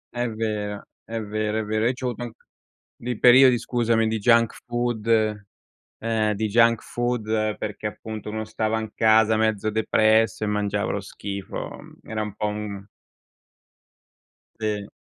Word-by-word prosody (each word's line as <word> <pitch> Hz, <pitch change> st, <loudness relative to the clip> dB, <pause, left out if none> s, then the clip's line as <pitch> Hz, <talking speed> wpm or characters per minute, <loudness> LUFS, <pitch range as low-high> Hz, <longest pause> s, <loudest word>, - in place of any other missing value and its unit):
È 120 Hz, 0 st, -1 dB
vero, 105 Hz, -2 st, -3 dB, 0.2 s
è 115 Hz, 0 st, -5 dB
vero, 105 Hz, +1 st, -2 dB
è 110 Hz, -, 0 dB
vero. 110 Hz, +1 st, -1 dB
Io 125 Hz, -, +1 dB
c'ho 130 Hz, 0 st, -7 dB
avuto 120 Hz, -, -6 dB
anc 120 Hz, -1 st, -6 dB, 0.6 s
dei 120 Hz, -2 st, -5 dB
periodi, 125 Hz, 0 st, +7 dB
scusami, 115 Hz, -2 st, +1 dB
di 110 Hz, 0 st, 0 dB
junk 115 Hz, +1 st, +3 dB
food 120 Hz, -2 st, -2 dB, 0.9 s
ehm, 110 Hz, -1 st, 0 dB
di 110 Hz, +2 st, -1 dB
junk 115 Hz, +1 st, +4 dB
food 110 Hz, -3 st, -1 dB
perché 105 Hz, 0 st, -4 dB
appunto 110 Hz, 0 st, -7 dB
uno 110 Hz, 0 st, -4 dB
stava 110 Hz, 0 st, -1 dB
in 110 Hz, -1 st, -5 dB
casa 110 Hz, 0 st, +4 dB
mezzo 110 Hz, -1 st, +1 dB
depresso, 110 Hz, 0 st, +2 dB
e -, -, -2 dB
mangiava 105 Hz, -1 st, -1 dB
lo 100 Hz, -, -2 dB
schifo. 100 Hz, 0 st, -6 dB, 0.3 s
Era 110 Hz, 0 st, -4 dB
un 105 Hz, -1 st, -4 dB
po' 105 Hz, -, -2 dB
un 105 Hz, -1 st, -5 dB, 1.7 s
Sì. 105 Hz, -2 st, -2 dB
110 Hz, 150 wpm, -24 LUFS, 105-115 Hz, 1.7 s, periodi